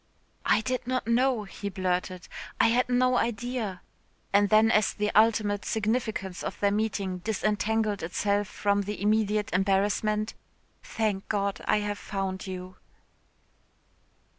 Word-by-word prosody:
"I - - +4
did 255 +1 -3
not 255 0 -1
know," 240 0 +2
he 200 0 -6
blurted, 185 -2 -2 0.3
"I - - +5
had 245 +2 +2
no 250 0 +3
idea," 235 -4 -2 0.5
and 200 0 +4
then 220 +2 +5
as 215 -3 +2
the 210 0 0
ultimate 210 -2 +3
significance 220 -4 -2
of - - -5
their 200 0 +2
meeting 200 -3 -1
disentangled 215 +1 0
itself 200 +4 0
from 200 +1 0
the 205 +1 -5
immediate 210 -1 +1
embarrassment, 205 +3 +1 0.5
"Thank 210 -3 -2
God, 200 -2 -1
I 210 - +2
have 205 0 -3
found 195 -1 -4
you." 185 0 -7
210 Hz, 130 wpm, -28 LUFS, 195-220 Hz, 0.5 s, I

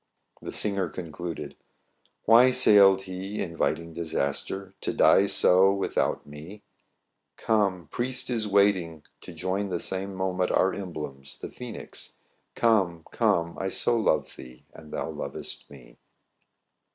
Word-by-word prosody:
The - - -6
singer 100 -4 -1
concluded; 80 -2 -7 0.2
— - - -46
" - - -36
Why 120 +3 +7
sailed 100 -6 +6
he 95 +2 -6
inviting 85 -1 -2
Disaster? 85 +4 -3
To - - -1
die 100 - +5
so 95 0 +4
without 100 0 -1
me? 80 +8 -11 0.7
Come! 100 -6 0
priest 130 +1 -2
is 115 -3 0
awaiting 95 -6 +2 0.2
To - - -10
join 95 +4 -2
the 90 -2 -2
same 95 +2 -4
moment 95 -1 -1
Our 95 - +2
emblems, 75 -8 -7
the - - -7
Phœnix! 125 -3 -8 0.4
Come, 95 -8 +2
come! 90 -7 +1
I 95 - -2
so 120 +5 +1
love 115 - 0
thee, 60 0 -13
And 75 -1 -13
thou - - -3
loves - - -5
t - - -18
me." 70 -4 -15
95 Hz, 140 wpm, -26 LUFS, 85-100 Hz, 0.7 s, Why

